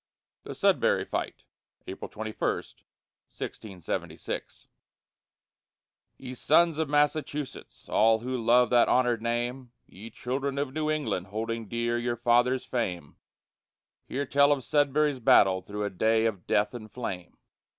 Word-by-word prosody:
THE -, -, -8 dB
SUDBURY -, -, +2 dB
FIGHT -, -, -4 dB, 0.4 s
[April 95 Hz, -, -7 dB
21, 110 Hz, 0 st, -7 dB, 0.9 s
1676] 95 Hz, -6 st, -6 dB, 1.5 s
Ye 130 Hz, -1 st, -8 dB
sons 160 Hz, +4 st, +3 dB
of 160 Hz, -3 st, -1 dB
Massachusetts, 145 Hz, -1 st, -1 dB
all 110 Hz, 0 st, +4 dB
who 130 Hz, +2 st, -3 dB
love 120 Hz, +1 st, +3 dB
that 120 Hz, -1 st, +5 dB
honored 125 Hz, -3 st, +2 dB
name, 120 Hz, +2 st, -3 dB
Ye 105 Hz, +5 st, -11 dB
children 135 Hz, +4 st, -3 dB
of 140 Hz, -2 st, -2 dB
New 155 Hz, 0 st, -1 dB
England, 145 Hz, -12 st, -1 dB
holding 115 Hz, +2 st, -4 dB
dear 120 Hz, +2 st, -1 dB
your 120 Hz, 0 st, -2 dB
fathers' 120 Hz, +2 st, +2 dB
fame, 90 Hz, -, -3 dB, 0.9 s
Hear 140 Hz, +2 st, -2 dB
tell 140 Hz, +1 st, +4 dB
of 140 Hz, -3 st, +1 dB
Sudbury's 145 Hz, 0 st, +2 dB
battle 95 Hz, -5 st, +5 dB
through 105 Hz, +2 st, -5 dB
a 100 Hz, -, -2 dB
day 110 Hz, +4 st, +2 dB
of 105 Hz, -6 st, -2 dB
death 105 Hz, +3 st, +1 dB
and 110 Hz, -3 st, -9 dB
flame! 95 Hz, -8 st, -6 dB
120 Hz, 130 wpm, -28 LUFS, 110-140 Hz, 1.5 s, that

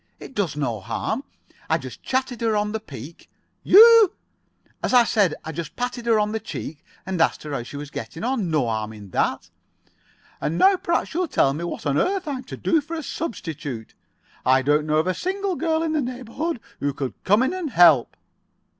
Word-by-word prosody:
It -, -, -10 dB
does 190 Hz, -, -1 dB
no 125 Hz, -7 st, -2 dB
harm. 115 Hz, -, -3 dB, 0.5 s
I -, -, +3 dB
just -, -, -9 dB
chatted 255 Hz, -2 st, -2 dB
her 225 Hz, -2 st, +1 dB
on 210 Hz, 0 st, 0 dB
the 220 Hz, -, -2 dB
peak——" 145 Hz, -, -11 dB, 0.3 s
"You——?" 450 Hz, -1 st, +8 dB, 0.7 s
"As -, -, +1 dB
I 245 Hz, -, +8 dB
said, 205 Hz, -8 st, +2 dB
I 160 Hz, -, -4 dB
just 165 Hz, 0 st, -6 dB
patted 245 Hz, -1 st, -4 dB
her 225 Hz, -2 st, +4 dB
on 210 Hz, 0 st, 0 dB
the 220 Hz, -, -2 dB
cheek, 155 Hz, -6 st, -7 dB, 0.2 s
and 185 Hz, -2 st, -2 dB
asked -, -, +2 dB
her 150 Hz, -, -7 dB
how 135 Hz, -, -2 dB
she 120 Hz, +4 st, -8 dB
was 145 Hz, 0 st, -7 dB
getting 135 Hz, +8 st, -7 dB
on. 235 Hz, -7 st, -1 dB
No 155 Hz, -5 st, +1 dB
harm 110 Hz, -1 st, -2 dB
in 100 Hz, -3 st, -12 dB
that." -, -, -1 dB, 0.9 s
"And 160 Hz, +3 st, -1 dB
now 390 Hz, -, +6 dB
perhaps 340 Hz, -2 st, -1 dB
you'll 355 Hz, +2 st, 0 dB
tell 135 Hz, -, +2 dB
me 160 Hz, +4 st, -5 dB
what 175 Hz, -, -6 dB
on 145 Hz, 0 st, +1 dB
earth 380 Hz, -2 st, 0 dB
I'm 265 Hz, -3 st, -3 dB
to -, -, -8 dB
do 325 Hz, -2 st, +2 dB
for 325 Hz, +3 st, -6 dB
a 320 Hz, -, -4 dB
substitute. 155 Hz, -, -5 dB, 0.5 s
I 130 Hz, +1 st, +4 dB
don't 150 Hz, +2 st, +2 dB
know 155 Hz, 0 st, +2 dB
of 155 Hz, -, +2 dB
a 185 Hz, -, +1 dB
single 385 Hz, -, -2 dB
girl 320 Hz, 0 st, 0 dB
in 320 Hz, -1 st, -1 dB
this 305 Hz, -, +1 dB
neighborhood 255 Hz, +5 st, -4 dB, 0.2 s
who 145 Hz, 0 st, -1 dB
could 135 Hz, -3 st, -3 dB
come 205 Hz, +6 st, +4 dB
in 265 Hz, +7 st, 0 dB
and 365 Hz, -5 st, -3 dB
help." 170 Hz, -, +5 dB
210 Hz, 210 wpm, -23 LUFS, -, 0.9 s, You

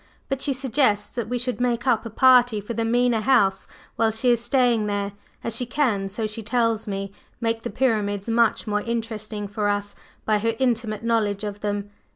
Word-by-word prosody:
But 270 Hz, -1 st, -2 dB
she 285 Hz, -, 0 dB
suggests 255 Hz, -5 st, +1 dB
that 235 Hz, -3 st, -4 dB
we 245 Hz, -, 0 dB
should 245 Hz, 0 st, -2 dB
make 240 Hz, -1 st, 0 dB
up 235 Hz, -3 st, +2 dB
a -, -, -7 dB
party 245 Hz, -1 st, +5 dB
for 205 Hz, +3 st, -6 dB
the 230 Hz, -, -1 dB
Mena 240 Hz, 0 st, +2 dB
House 200 Hz, -6 st, +2 dB, 0.3 s
while 225 Hz, -1 st, +3 dB
she 225 Hz, +3 st, +1 dB
is 235 Hz, -1 st, +2 dB
staying 240 Hz, -4 st, +2 dB
there, 200 Hz, -1 st, -2 dB, 0.3 s
as 230 Hz, -, -1 dB
she 250 Hz, -, -1 dB
can, 230 Hz, -8 st, 0 dB
so 215 Hz, +3 st, -3 dB
she 215 Hz, +1 st, -5 dB
tells 225 Hz, 0 st, 0 dB
me, 195 Hz, -1 st, -4 dB, 0.3 s
make 225 Hz, 0 st, -1 dB
the -, -, -4 dB
Pyramids 205 Hz, -4 st, 0 dB
much 230 Hz, -1 st, +2 dB
more 210 Hz, -1 st, 0 dB
interesting 220 Hz, -2 st, -4 dB
for 205 Hz, 0 st, -2 dB
us 205 Hz, 0 st, -2 dB, 0.3 s
by 215 Hz, -1 st, +2 dB
her 230 Hz, +2 st, 0 dB
intimate 230 Hz, -4 st, -1 dB
knowledge 215 Hz, -3 st, 0 dB
of 205 Hz, -1 st, -4 dB
them. 205 Hz, 0 st, -3 dB
225 Hz, 195 wpm, -24 LUFS, 205-245 Hz, 0.3 s, party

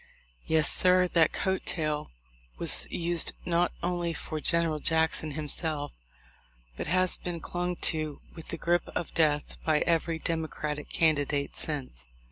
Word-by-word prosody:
Yes, 160 Hz, -2 st, +4 dB
sir, 180 Hz, 0 st, +5 dB
that 165 Hz, -2 st, +4 dB
coat 190 Hz, -1 st, -1 dB
tail 155 Hz, -3 st, -2 dB, 0.5 s
was -, -, +2 dB
used 170 Hz, -1 st, +2 dB
not 175 Hz, 0 st, +2 dB
only 175 Hz, -1 st, -1 dB
for 155 Hz, -1 st, -5 dB
General 165 Hz, -2 st, +1 dB
Jackson 160 Hz, 0 st, +1 dB
himself, 150 Hz, 0 st, -3 dB, 0.8 s
but -, -, -5 dB
has 185 Hz, +2 st, +2 dB
been 175 Hz, -1 st, -5 dB
clung 180 Hz, +2 st, -3 dB
to 155 Hz, -3 st, -1 dB
with 165 Hz, -, -11 dB
the -, -, -5 dB
grip 175 Hz, 0 st, +1 dB
of 175 Hz, -, -3 dB
death 150 Hz, -2 st, +1 dB
by 155 Hz, -1 st, +2 dB
every 165 Hz, -1 st, +1 dB
Demo 160 Hz, 0 st, -2 dB
cratic 150 Hz, -1 st, -5 dB
candidate 145 Hz, -3 st, +1 dB
since. 130 Hz, -, -3 dB
160 Hz, 140 wpm, -28 LUFS, 150-170 Hz, 0.8 s, sir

